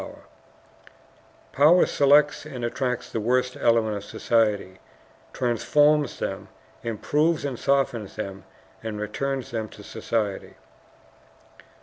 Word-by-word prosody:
Power 155 +6 +5
selects 145 +1 +3
and 130 -5 -5
attracts 125 +1 -2
the - - -2
worst 125 +3 +1
elements 110 -3 +1
of - - -13
society, 105 -5 +1 0.5
transforms 145 +4 +2
them, - - -4 0.3
improves 150 +8 0
and 130 -4 -4
softens 135 -7 0
them, 100 -2 -6 0.4
and 110 -2 -5
returns 135 +5 -3
them 110 -2 -3
to 105 - -13
society. 105 -2 -3
120 Hz, 100 wpm, -25 LUFS, 110-140 Hz, 0.5 s, Power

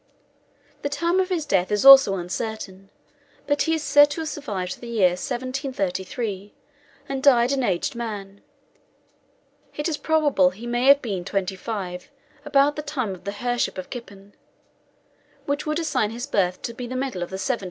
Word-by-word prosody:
* - - -36
The 285 - -2
time 335 +6 0
of 375 0 0
his 340 -5 -1
death 190 -9 +1
is 210 +4 +1
also 270 -7 +9
uncertain, 195 +1 -5 0.6
but 290 0 0
as - - +3
he 325 0 +1
is 315 - -4
said 290 +1 +6
to 290 +3 -4
have 315 - -3
survived 200 -13 -5
the 240 - -8
year 215 -6 +3
1733, 210 -3 -4 0.5
and 270 -1 -3
died 250 -3 +5
an 275 -1 0
aged 190 -8 -1
man, 205 -4 -6 1.3
it 295 +2 -2
is 315 -3 -1
probable 295 - +3
he 205 +6 -11
may 240 +2 0
have 280 +1 +6
been 195 -7 -3
twenty 195 0 -2
five 185 -3 -6 0.3
about 285 0 +3
the 300 - -4
time 265 -9 -3
of 180 0 -13
the 200 - -2
Her' 245 0 0
ship - - -1
of 185 - -7
Kippen, 200 -5 -10 1.1
which 285 +2 -2
would 305 0 0
assign 310 -10 0
his 235 +3 -5
birth 185 -9 0
to 235 - -4
the 245 +1 -6
middle 255 -8 -3
of 175 - -3
the 190 - -6
17th - - -6
century. 260 -3 0
240 Hz, 185 wpm, -23 LUFS, 195-285 Hz, 1.3 s, also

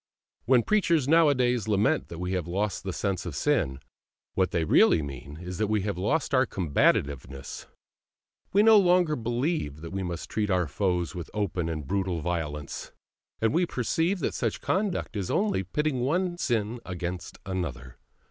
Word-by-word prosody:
When 125 -1 +4
preachers 170 - +2
nowadays 130 - +3
lament 105 0 +2
that 85 - -8
we 90 +1 -3
have 90 -3 -1
lost 95 +1 -2
the 95 - -3
sense 95 0 -2
of 80 - -5
sin, 75 - +1 0.5
what 95 -1 +2
they 85 - 0
really 80 0 +5
mean 70 +1 -8
is 90 0 -6
that 110 - +1
we 105 -1 +1
have 100 -1 -2
lost 140 - 0
our 130 -1 +4
combativeness: 70 -6 0 0.8
we 205 +2 +5
no 220 -1 +8
longer 180 -4 +3
believe 120 - -2
that 85 - -7
we 95 - -3
must 85 -2 -4
treat 105 -1 -1
our 90 -3 +2
foes 90 +1 -1
with 85 -3 -6
open 90 -5 -1
and 75 -3 -4
brutal 95 +2 -1
violence, 75 -4 -4 0.5
and 110 +2 +1
we 175 +2 +2
perceive 165 - 0
that - - -1
such 115 -4 -2
conduct 190 - -1
is 100 -3 -2
only 205 - +1
pitting 150 - -1
one 175 +8 0
sin 115 -3 -1
against 90 -1 -5
another. 85 -10 -5
100 Hz, 165 wpm, -27 LUFS, 85-135 Hz, 0.8 s, no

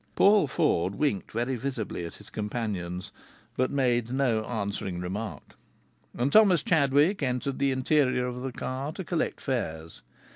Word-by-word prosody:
Paul 200 -5 +5
Ford 95 -7 +1
winked 140 -9 -1
very 120 +4 -1
visibly 120 -8 -4
at - - -11
his - - -15
companions, 105 -5 -4 0.4
but 130 0 +1
made 120 -4 +1
no 125 -5 +1
answering 100 -5 -3
remark. 100 +5 -5 0.6
And 130 +4 0
Thomas 200 -6 +6
Chadwick 150 +3 +3
entered 130 0 -1
the 140 0 +2
interior 130 -1 +2
of 125 0 -4
the 135 0 -3
car 130 +4 -4
to 190 - -5
collect 170 -1 -2
fares. 80 - -4
125 Hz, 145 wpm, -28 LUFS, 105-140 Hz, 0.6 s, Thomas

